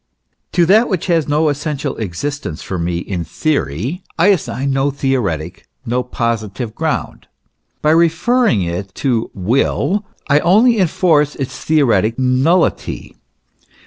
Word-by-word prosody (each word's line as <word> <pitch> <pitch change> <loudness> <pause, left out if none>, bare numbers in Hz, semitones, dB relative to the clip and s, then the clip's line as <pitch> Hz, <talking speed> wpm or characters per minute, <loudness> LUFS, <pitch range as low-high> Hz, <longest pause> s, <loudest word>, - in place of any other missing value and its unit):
To 175 -1 +4
that 215 +7 +4
which 185 -5 -1
has 165 -4 +1
no 150 +2 +2
essential 145 -1 -3
existence 100 - -4
for 95 - -4
me 85 0 -1
in 90 0 -4
theory, 140 - -2 0.2
I 175 +5 +4
assign 140 -7 0
no 135 +1 +1
theoretic, 105 - -2 0.2
no 125 +1 0
positive 115 -3 -3
ground. - - -3 0.6
By 150 - +4
referring 165 - +3
it 90 +3 -5
to 120 -5 -1
Will 135 - 0 0.2
I 145 0 +4
only 215 +8 +4
enforce 160 -5 +2
its 135 -2 -4
theoretic 120 -7 +1
nullity. 130 +7 +1
140 Hz, 125 wpm, -17 LUFS, 110-165 Hz, 0.6 s, To